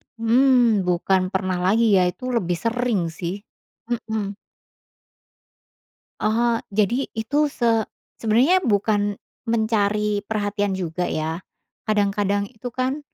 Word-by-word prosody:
Mmm, 230 Hz, -3 st, +3 dB
bukan 185 Hz, +1 st, +2 dB
pernah 185 Hz, -1 st, -1 dB
lagi 225 Hz, +3 st, +3 dB
ya 180 Hz, -1 st, +4 dB
itu 255 Hz, +8 st, -4 dB
lebih 180 Hz, -8 st, 0 dB
sering 230 Hz, -6 st, -1 dB
sih, 170 Hz, +3 st, -4 dB, 0.6 s
mhm. 215 Hz, -4 st, -3 dB, 1.8 s
Oh 230 Hz, +2 st, +2 dB, 0.2 s
jadi 215 Hz, +6 st, +1 dB
itu 285 Hz, +7 st, +1 dB
se 230 Hz, -6 st, +1 dB, 0.3 s
sebenarnya 240 Hz, +11 st, +3 dB
bukan, 205 Hz, -1 st, +1 dB, 0.3 s
mencari 210 Hz, -2 st, +1 dB
perhatian 205 Hz, -2 st, -1 dB
juga 180 Hz, -1 st, -2 dB
ya, 160 Hz, +2 st, -2 dB, 0.5 s
kadang-kadang 205 Hz, -1 st, +1 dB
itu 245 Hz, +1 st, -8 dB
kan, 260 Hz, +3 st, -1 dB
215 Hz, 105 wpm, -22 LUFS, 195-235 Hz, 1.8 s, ya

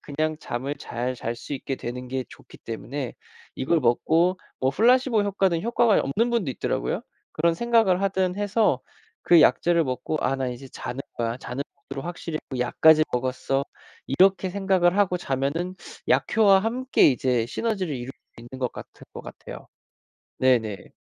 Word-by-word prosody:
그냥 155 Hz, +2 st, -2 dB
잠을 135 Hz, +1 st, -4 dB
잘 125 Hz, 0 st, -4 dB
잘 115 Hz, 0 st, -3 dB
수 120 Hz, -, -9 dB
있게 135 Hz, 0 st, -4 dB
되는 125 Hz, +1 st, -6 dB
게 130 Hz, 0 st, -3 dB
좋기 -, -, -15 dB
때문에 120 Hz, +3 st, -6 dB, 0.4 s
이걸 165 Hz, +5 st, +1 dB
먹고 165 Hz, +9 st, +2 dB, 0.2 s
뭐 130 Hz, 0 st, +2 dB
플라세보 240 Hz, -, +3 dB
효과는 195 Hz, -4 st, +1 dB
효과가 235 Hz, -1 st, +3 dB
없는 225 Hz, -, 0 dB
분도 225 Hz, -, 0 dB
있더라고요. -, -, -2 dB, 0.3 s
그런 165 Hz, +1 st, +1 dB
생각을 225 Hz, -4 st, +2 dB
하든 190 Hz, -2 st, 0 dB
해서 205 Hz, -, +1 dB, 0.4 s
그 170 Hz, -2 st, +6 dB
약재를 170 Hz, +2 st, +4 dB
먹고 130 Hz, +4 st, -3 dB
'아 135 Hz, -, 0 dB
나 135 Hz, -1 st, -2 dB
이제 130 Hz, +2 st, -8 dB
자는 125 Hz, +1 st, -6 dB
거야. 115 Hz, 0 st, -2 dB
자는 130 Hz, +2 st, -5 dB, 0.3 s
모드로 135 Hz, 0 st, -5 dB
확실히 170 Hz, -2 st, -5 dB, 0.2 s
약까지 155 Hz, +6 st, +5 dB
먹었어.' 130 Hz, +2 st, -1 dB, 0.4 s
이렇게 190 Hz, +6 st, +3 dB
생각을 190 Hz, -2 st, +2 dB
하고 195 Hz, -3 st, +2 dB
자면은 160 Hz, +4 st, -2 dB, 0.3 s
약효와 200 Hz, -3 st, +4 dB
함께 250 Hz, +5 st, +3 dB
이제 125 Hz, -2 st, +1 dB
시너지를 190 Hz, -, -2 dB
이룰 120 Hz, 0 st, -7 dB
수 -, -, -7 dB, 0.4 s
있는 130 Hz, -, -7 dB
것 125 Hz, -2 st, -1 dB
같으 -, -, -9 dB
같을 -, -, -13 dB
것 -, -, -7 dB
같아요. -, -, -10 dB, 0.7 s
네네. 115 Hz, -6 st, +1 dB
155 Hz, 330 characters per minute, -25 LUFS, 130-195 Hz, 0.7 s, 그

